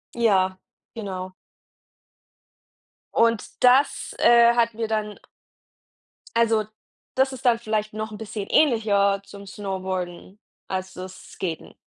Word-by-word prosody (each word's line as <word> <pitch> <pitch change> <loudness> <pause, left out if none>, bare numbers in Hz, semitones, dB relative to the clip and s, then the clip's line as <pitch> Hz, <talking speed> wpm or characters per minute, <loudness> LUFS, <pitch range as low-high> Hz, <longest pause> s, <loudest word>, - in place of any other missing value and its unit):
Ja, 190 -5 +2 0.4
genau. 190 -4 -5 1.8
Und 230 +1 +1
das, 255 +3 +4
äh, 235 0 +6
hat 230 -1 +2
mir 225 0 -3
dann 215 -1 -3 1.2
also, 225 -2 +3 0.5
das 265 +1 +3
ist 260 - -10
dann 235 -2 +4
vielleicht 215 -2 -2
noch 215 0 -4
'n 210 - -7
bisschen 210 -2 -6
ähnlicher 205 -8 +3
zum 200 0 -11
Snowboarden, 190 -1 -5 0.3
als 190 0 -4
das 185 0 -8 0.2
Skaten. 170 -4 -5
215 Hz, 110 wpm, -24 LUFS, 190-230 Hz, 1.8 s, äh